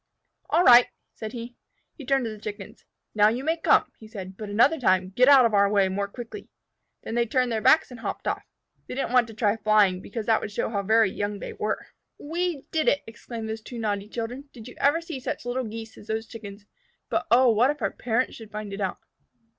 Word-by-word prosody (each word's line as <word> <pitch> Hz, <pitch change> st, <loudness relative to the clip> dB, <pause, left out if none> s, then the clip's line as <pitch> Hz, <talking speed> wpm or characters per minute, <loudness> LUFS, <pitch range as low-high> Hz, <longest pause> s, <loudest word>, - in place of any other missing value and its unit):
"All 350 Hz, -, +3 dB
right!" 245 Hz, -3 st, +8 dB, 0.3 s
said 220 Hz, 0 st, -7 dB
he. 240 Hz, 0 st, -7 dB, 0.4 s
He 280 Hz, -6 st, -12 dB
turned 270 Hz, -2 st, +2 dB
to 225 Hz, -, -3 dB
the 215 Hz, -, -9 dB
Chickens. 205 Hz, -2 st, -8 dB, 0.3 s
"Now 210 Hz, -1 st, +5 dB
you 240 Hz, +4 st, -3 dB
may 320 Hz, +3 st, +1 dB
come," 330 Hz, -, +3 dB
he 220 Hz, -, -12 dB
said. 190 Hz, -4 st, -8 dB
"But 210 Hz, +1 st, -7 dB
another 255 Hz, +10 st, +3 dB
time 185 Hz, -5 st, +2 dB
get 250 Hz, +7 st, +4 dB
out 270 Hz, -3 st, +8 dB
of 225 Hz, -, +1 dB
our 200 Hz, -1 st, +4 dB
way 200 Hz, -2 st, +3 dB
more 200 Hz, +1 st, -2 dB
quickly." 240 Hz, -, -9 dB, 0.5 s
Then -, -, -6 dB
they 235 Hz, 0 st, +1 dB
turned 250 Hz, +1 st, +1 dB
their 220 Hz, -1 st, -1 dB
backs 310 Hz, +5 st, +4 dB
and 245 Hz, -, -9 dB
hopped -, -, -5 dB
off. -, -, -1 dB, 0.4 s
They -, -, -6 dB
didn't 270 Hz, -, -2 dB
want 245 Hz, -2 st, +4 dB
to 225 Hz, -, -11 dB
try 215 Hz, -1 st, +1 dB
flying, 210 Hz, -4 st, +3 dB
because 215 Hz, +2 st, -6 dB
that 225 Hz, -1 st, +2 dB
would 205 Hz, -, -5 dB
show 205 Hz, -, -2 dB
how 200 Hz, -3 st, -1 dB
very 220 Hz, 0 st, +3 dB
young 205 Hz, +1 st, -3 dB
they -, -, -7 dB
were. 215 Hz, -, -3 dB, 0.3 s
"We 330 Hz, -1 st, -3 dB
did 315 Hz, -1 st, 0 dB
it," 285 Hz, -, +3 dB
exclaimed 225 Hz, 0 st, -8 dB
those 220 Hz, 0 st, -5 dB
two 240 Hz, +2 st, -9 dB
naughty 205 Hz, -2 st, -2 dB
children. 245 Hz, +5 st, -5 dB
"Did 230 Hz, -2 st, -11 dB
you 250 Hz, -, -10 dB
ever 290 Hz, +4 st, +3 dB
see 330 Hz, -5 st, -6 dB
such 250 Hz, -, -5 dB
little 250 Hz, +1 st, -2 dB
Geese 225 Hz, 0 st, -8 dB
as 205 Hz, -, -15 dB
those 220 Hz, 0 st, -2 dB
Chickens? 205 Hz, -3 st, -10 dB, 0.4 s
But -, -, -1 dB
oh, 250 Hz, 0 st, +6 dB
what 230 Hz, +4 st, +3 dB
if 295 Hz, -, -3 dB
our -, -, +1 dB
parents 245 Hz, +1 st, -1 dB
should 225 Hz, -2 st, -11 dB
find 210 Hz, -1 st, -6 dB
it 200 Hz, -, -5 dB
out?" 190 Hz, -2 st, -2 dB
225 Hz, 235 wpm, -25 LUFS, 210-250 Hz, 0.5 s, right